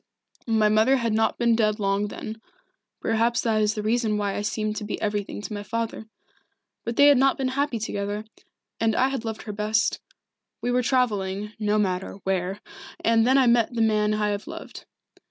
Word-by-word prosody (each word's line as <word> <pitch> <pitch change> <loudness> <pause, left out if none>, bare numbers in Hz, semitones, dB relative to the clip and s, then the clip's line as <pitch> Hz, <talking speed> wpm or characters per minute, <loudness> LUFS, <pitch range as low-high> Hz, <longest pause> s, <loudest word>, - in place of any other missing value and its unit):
My 220 -2 +3
mother 220 +5 +4
had 230 -3 -1
not 220 +1 +1
been 235 -1 +3
dead 215 -1 +1
long 200 0 0
then 220 +2 -7 0.6
perhaps 230 +1 +1
that 220 -2 +1
is 210 0 +1
the 210 - -3
reason 220 -1 +1
why 205 -1 -1
I - - -2
seemed 215 0 -2
to 215 - -4
be 210 - -4
everything 205 -1 -3
to 215 - -5
my 205 - -4
father. 225 0 -4 0.8
But 235 +1 -3
they 285 - +6
had 285 -3 +7
not 270 0 +3
been 265 -1 -1
happy 275 -1 -1
together, 205 0 -3 0.5
and 225 -1 +2
I 260 +1 +3
had 270 -4 -3
loved 220 -1 -5
her 210 - -6
best. 215 +1 0 0.6
We 245 - -1
were 250 +1 +2
travelling 210 -5 0
no 210 0 +1
matter 190 -3 -1
where 190 +1 -1 0.4
and 230 0 +4
then 260 +2 +5
I 265 - +5
met 235 0 +3
the 230 - +1
man 215 -1 +2
I 210 0 0
have 205 +4 -3
loved. 330 0 -9
220 Hz, 195 wpm, -25 LUFS, 210-235 Hz, 0.8 s, had